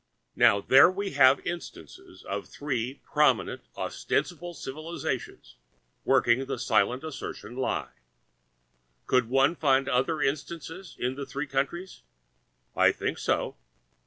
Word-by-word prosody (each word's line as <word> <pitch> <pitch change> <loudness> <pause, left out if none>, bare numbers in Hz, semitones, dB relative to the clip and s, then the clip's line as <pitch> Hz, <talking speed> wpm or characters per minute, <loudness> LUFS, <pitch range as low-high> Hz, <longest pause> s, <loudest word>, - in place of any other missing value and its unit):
Now 100 - +5
there 135 - +7
we 195 +1 -3
have 135 -1 +5
instances 95 - -8
of 100 +1 -5
three 130 -3 -3
prominent - - +2 0.2
ostensible 175 0 -2
civilisations 155 +5 -5 0.5
working 120 +3 +3
the 135 -1 -3
silent 125 +1 +1
assertion 135 -6 -7
lie. 130 - -2 1.1
Could 125 -3 +2
one 135 +4 +4
find 135 -4 +2
other 140 +4 +1
instances 160 +4 -4
in 125 +1 -1
the 140 +1 -6
three 140 +2 -4
countries? 140 - -3 0.7
I - - +5
think - - -3
so. - - -1
135 Hz, 115 wpm, -27 LUFS, 130-160 Hz, 1.1 s, there